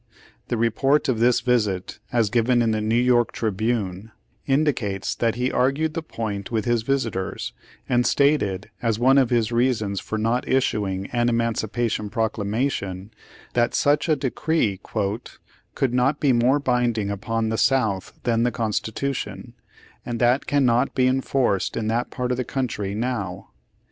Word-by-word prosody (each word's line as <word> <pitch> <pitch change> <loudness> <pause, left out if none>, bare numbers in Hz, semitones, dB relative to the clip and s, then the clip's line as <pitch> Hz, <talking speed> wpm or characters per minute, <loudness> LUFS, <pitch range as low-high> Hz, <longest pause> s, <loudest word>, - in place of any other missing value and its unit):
The 120 - -1
re 115 +1 +2
port 140 +6 +2
of 120 -4 +1
this 120 +1 +3
visit, 105 -7 0
as 115 -4 +1
given 120 +1 +3
in 115 - +1
the 110 - 0
Neiv 115 +3 +2
York 120 -2 +3
Tribune, 110 -2 -2 0.4
indicates 135 -9 0
that 115 -1 0
he 125 +1 0
argued 140 +5 +1
the 165 - -2
point 110 -9 -5
with 110 -3 -1
his 120 -1 +2
visitors, 115 -7 -2 0.3
and 120 0 +2
stated 105 -10 +1
as 115 -3 0
one 130 +4 +5
of 130 -3 +2
his 115 -2 +1
reasons 115 -5 +1
for 110 - -4
not 115 +3 0
issuing 100 -7 0
an 120 0 +1
emancipation 115 -1 -1
proclamation 105 -3 -2 0.4
that 120 0 +1
such 145 +3 +2
a 155 - +4
decree 130 - 0 1.0
"could 130 -3 0
not 130 +4 +2
be 140 -3 +3
more 125 +4 +3
binding 120 -6 0
upon 110 +3 -2
the 110 - -1
South 110 -8 +1
than 115 -2 +1
the 120 - +3
Constitution, 115 +4 -3 0.5
and 120 -1 -4
that 125 +3 +2
cannot 130 -2 +2
be 130 - +3
enforced 130 -5 +1
in 115 - -2
that 120 +2 0
paii: 125 -1 -3
of 125 - 0
the 125 - -1
country 110 -7 -3
now." 110 -6 -3
120 Hz, 155 wpm, -23 LUFS, 110-130 Hz, 1.0 s, one